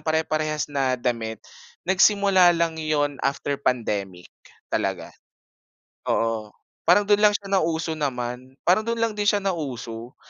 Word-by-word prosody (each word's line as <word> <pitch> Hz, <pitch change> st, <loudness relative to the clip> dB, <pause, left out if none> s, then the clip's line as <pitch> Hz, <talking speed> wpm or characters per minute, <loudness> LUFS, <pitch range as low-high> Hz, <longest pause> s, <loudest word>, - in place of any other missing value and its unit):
pare-parehas 155 Hz, -1 st, -1 dB
na 135 Hz, -2 st, +1 dB
damit, 115 Hz, -3 st, -3 dB, 0.4 s
nagsimula 190 Hz, -1 st, +4 dB
lang 165 Hz, -1 st, -1 dB
yun 145 Hz, -2 st, -1 dB
after 140 Hz, 0 st, -2 dB
pandemic 100 Hz, -9 st, -2 dB, 0.4 s
talaga. -, -, -2 dB, 1.0 s
Oo. 115 Hz, -2 st, 0 dB, 0.4 s
Parang 190 Hz, +4 st, +6 dB
do'n 205 Hz, 0 st, +3 dB
lang 210 Hz, 0 st, +5 dB
siya 195 Hz, -1 st, -10 dB
nauso 165 Hz, -3 st, +1 dB
naman. 130 Hz, -3 st, -4 dB
Parang 185 Hz, +4 st, +4 dB
do'n 230 Hz, +1 st, -2 dB
lang 230 Hz, -1 st, +1 dB
din 205 Hz, 0 st, -1 dB
siya 205 Hz, -, +4 dB
nauso. 130 Hz, -, -5 dB
155 Hz, 130 wpm, -24 LUFS, 125-190 Hz, 1.0 s, Parang